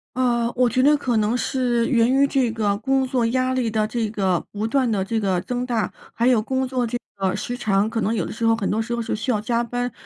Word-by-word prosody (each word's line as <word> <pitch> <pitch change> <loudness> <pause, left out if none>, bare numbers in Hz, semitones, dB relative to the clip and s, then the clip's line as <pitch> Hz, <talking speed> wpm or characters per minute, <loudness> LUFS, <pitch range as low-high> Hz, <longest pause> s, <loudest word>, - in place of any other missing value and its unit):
呃， 240 -2 +1
我 250 0 +3
觉 255 +3 +1
得 295 +2 +5
可 250 -5 0
能 215 +2 +1
是 245 -2 0
源 235 -2 +3
于 275 +1 +4
这 265 -3 +1
个 205 -3 0
工 265 +4 +1
作 250 -2 0
压 255 +2 0
力 250 -3 0
的 215 -1 0
这 225 -1 -2
个 190 -5 +1
不 210 +1 -4
断 255 +1 +1
地 200 -3 0
这 225 +3 -1
个 190 -4 0
增 245 +5 -3
大， 235 -3 -1 0.2
还 235 +2 +1
有 245 -4 +4
工 260 +4 -1
作 250 -2 -1
这 245 - -2 0.2
个 190 -1 0
时 245 - -4
长， 205 -1 +1
可 230 0 -2
能 225 +2 0
有 190 - -1
的 - - -6
时 230 0 -3
候 225 0 +4
很 205 -3 -2
多 220 +2 0
时 235 +1 -3
候 235 - -2
是 225 - -3
需 220 +4 -3
要 215 -4 +1
加 235 +2 0
班， 245 +1 -3
235 Hz, 285 characters per minute, -22 LUFS, 215-250 Hz, 0.2 s, 得